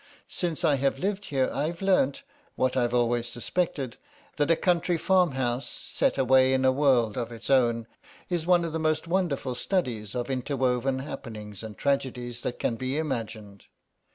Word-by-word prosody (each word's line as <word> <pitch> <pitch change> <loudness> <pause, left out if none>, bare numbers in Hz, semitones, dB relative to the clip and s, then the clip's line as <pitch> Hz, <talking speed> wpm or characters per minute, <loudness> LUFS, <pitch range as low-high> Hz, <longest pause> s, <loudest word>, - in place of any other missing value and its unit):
Since 175 -1 -1
I 145 -3 +4
have 135 0 +1
lived 195 +5 -2
here 135 -2 +1
I've 155 +5 -2
learnt, 185 -9 +2 0.3
what 130 0 +1
I've 120 -2 +1
always 120 0 +1
suspected, 130 0 -2 0.4
that 145 0 +1
a 165 - +6
country 175 0 +1
farmhouse, 135 -10 +1
set - - -1
away 130 0 +5
in 130 0 +1
a 130 - +6
world 130 -5 +2
of 120 -1 -4
its 115 +3 -5
own, 120 -3 +3 0.4
is 175 -2 -2
one 175 -2 +4
of 165 - -4
the 160 - -1
most 155 +1 0
wonderful 165 -8 0
studies 120 - -2
of 125 +2 -2
interwoven 130 0 0
happenings 110 -7 -7
and 110 -2 -8
tragedies 125 -4 -1
that 120 - -3
can 115 - -1
be 130 +3 -2
imagined. 110 -9 -4
130 Hz, 165 wpm, -27 LUFS, 120-160 Hz, 0.4 s, a